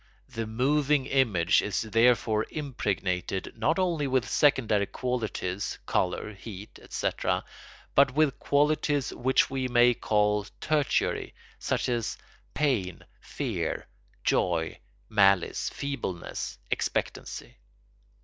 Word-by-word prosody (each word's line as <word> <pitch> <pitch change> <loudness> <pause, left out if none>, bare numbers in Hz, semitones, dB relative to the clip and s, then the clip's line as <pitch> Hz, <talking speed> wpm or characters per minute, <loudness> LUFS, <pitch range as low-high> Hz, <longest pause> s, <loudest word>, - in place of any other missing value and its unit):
The 115 -1 -4
moving 140 +4 +2
image 115 -12 +3
is 105 - -1
therefore 115 -1 +3
impregnated 95 - -2
not 145 +9 +1
only 170 -6 +1
with 130 -2 +1
secondary 110 -8 +3
qualities—colour, 105 -4 -2
heat, 100 0 -10
etc.—but - - -1
with 150 -3 +2
qualities 145 -1 +1
which 130 +1 +2
we 130 -1 -1
may 120 0 +5
call 105 -2 +1
tertiary, 150 -2 0 0.2
such - - -1
as 120 -3 -1 0.4
pain, 115 - 0
fear, - - -3 0.4
joy, 85 -3 +1 0.3
malice, 100 -4 +3
feebleness, 140 -11 -4
expectancy. - - -3
120 Hz, 90 wpm, -28 LUFS, 100-140 Hz, 0.4 s, may